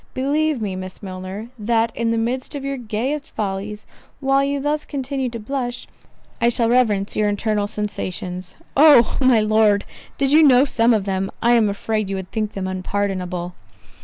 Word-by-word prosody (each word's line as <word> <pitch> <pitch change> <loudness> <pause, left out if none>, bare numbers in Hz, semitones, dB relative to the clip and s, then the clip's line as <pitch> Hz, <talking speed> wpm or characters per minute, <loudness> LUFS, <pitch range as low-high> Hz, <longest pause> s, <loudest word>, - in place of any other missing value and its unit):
Believe 290 +2 +1
me, 195 -3 -3
Miss 185 +2 -8
Milner, 190 +3 -7
that 225 +1 +1
in 230 -1 0
the 230 - +1
midst 250 +5 -2
of 275 -1 -5
your 275 0 -2
gayest 250 +6 -3
follies, 205 0 -4 0.3
while 275 0 +2
you 280 0 -1
thus 295 +2 -1
continue 270 -2 -3
to 230 -1 -6
blush, 245 +1 -4 0.6
I 235 - +4
shall 235 -1 +1
reverence 215 -5 +2
your 210 -1 +2
internal 205 0 0
sensations." 185 -3 -5 0.2
"Oh! 285 -5 +6
my 255 -4 +5
Lord, 215 -1 +3 0.3
did 275 -1 +1
you 310 +2 +7
know 270 -3 +6
some 235 -3 +3
of 205 -3 -1
them, 195 0 -1
I 235 - +3
am 230 -3 +4
afraid 215 0 -2
you 195 - -2
would 190 -1 -6
think 215 -2 -2
them 195 -1 -4
unpardonable." 185 -2 -3
225 Hz, 175 wpm, -21 LUFS, 200-260 Hz, 0.6 s, you